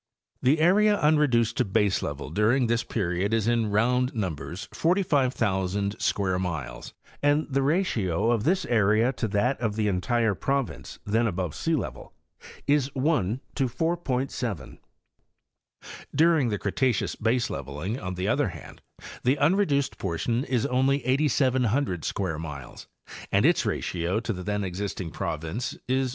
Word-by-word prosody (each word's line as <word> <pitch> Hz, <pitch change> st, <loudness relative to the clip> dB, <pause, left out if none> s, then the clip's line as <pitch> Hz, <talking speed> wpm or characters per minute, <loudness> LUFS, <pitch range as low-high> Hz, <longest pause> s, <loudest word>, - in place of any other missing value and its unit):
The 135 Hz, +5 st, +4 dB
area 205 Hz, +5 st, +4 dB
unreduced 135 Hz, -7 st, +3 dB
to 125 Hz, -, +3 dB
baselevel 90 Hz, -, -1 dB
during 115 Hz, +7 st, +3 dB
this 115 Hz, 0 st, +1 dB
period 100 Hz, +1 st, -1 dB
is 110 Hz, -1 st, 0 dB
in 115 Hz, -2 st, +2 dB
round 125 Hz, +5 st, +1 dB
numbers 90 Hz, -, -4 dB
45,000 110 Hz, -, 0 dB
square 95 Hz, -2 st, +1 dB
miles, 80 Hz, -9 st, -5 dB, 0.3 s
and 145 Hz, +2 st, +3 dB
the 135 Hz, -1 st, 0 dB
ratio 120 Hz, -, +1 dB
of 115 Hz, -3 st, +1 dB
this 185 Hz, +6 st, +1 dB
area 110 Hz, +2 st, +3 dB
to 115 Hz, -, -2 dB
that 115 Hz, +6 st, 0 dB
of 110 Hz, -3 st, -1 dB
the 110 Hz, -1 st, 0 dB
entire 105 Hz, +4 st, +1 dB
province 135 Hz, +5 st, -3 dB
then 115 Hz, +3 st, +2 dB
above 90 Hz, -5 st, -2 dB
sealevel 160 Hz, -, -3 dB, 0.5 s
is 145 Hz, -2 st, +2 dB
1:4.7.. 130 Hz, -, -1 dB, 1.4 s
Dur 165 Hz, +3 st, +5 dB
ing 125 Hz, -4 st, +1 dB
the 105 Hz, -, -1 dB
Cretaceous 115 Hz, +3 st, 0 dB
baseleveling, 105 Hz, -, -2 dB
on 90 Hz, -2 st, -4 dB
the 90 Hz, +1 st, -2 dB
other -, -, +2 dB
hand, -, -, -10 dB, 0.4 s
the 130 Hz, +3 st, +3 dB
unreduced 145 Hz, -3 st, +2 dB
portion 95 Hz, +7 st, -1 dB
is 125 Hz, -4 st, 0 dB
only 130 Hz, +1 st, +1 dB
8,700 130 Hz, -, +1 dB
square 90 Hz, -6 st, -2 dB
miles 70 Hz, -6 st, -8 dB, 0.4 s
and -, -, +3 dB
its -, -, +3 dB
ratio 90 Hz, +4 st, -1 dB
to 115 Hz, -, -2 dB
the 90 Hz, -, -6 dB
then 105 Hz, +2 st, -2 dB
exist 95 Hz, +2 st, -4 dB
ing 85 Hz, -4 st, -5 dB
province 80 Hz, +9 st, -3 dB
1: 130 Hz, +1 st, +1 dB
22. -, -, -5 dB
115 Hz, 140 wpm, -26 LUFS, 95-135 Hz, 1.4 s, Dur